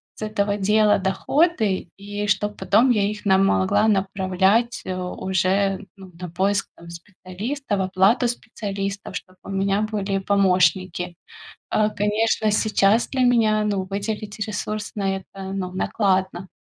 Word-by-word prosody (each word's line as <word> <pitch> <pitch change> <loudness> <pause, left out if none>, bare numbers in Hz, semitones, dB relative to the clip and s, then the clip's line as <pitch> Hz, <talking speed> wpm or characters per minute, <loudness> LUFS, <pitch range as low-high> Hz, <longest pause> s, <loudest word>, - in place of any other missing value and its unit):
с - - -15
этого 210 -1 -1
дела 210 +1 +3
доходы, 200 - +1
и 205 +1 -5
чтоб 210 0 0
потом 225 +7 +3
я 210 -4 +2
их 210 0 -7
на, 190 -1 +5
могла 195 - +3
направлять, 195 +3 +1
э, 185 - -3
уже, 190 +2 -1
ну, 190 -1 -12
на 180 -1 -6
поиск, 190 +4 0
там, 170 - -14
специалистов, 200 +7 -5
оплату 190 +6 +3
специалистов, 200 -4 -5
чтоб 185 -1 -13
у - - -10
меня 195 +1 0
были 195 -2 -1
помощники. 185 -2 +1 0.5
А, 215 -1 +2
конечно, 215 +1 +1
сейчас 215 +1 +2
для 265 - -1
меня, 220 -3 +3
ну, 200 -2 -1
выделить 205 +1 -4
ресурс 215 -1 -4
на 195 -2 -1
это, 190 0 -8
ну, 185 -2 -3
накладно. 190 -1 0
200 Hz, 135 wpm, -22 LUFS, 190-215 Hz, 0.5 s, на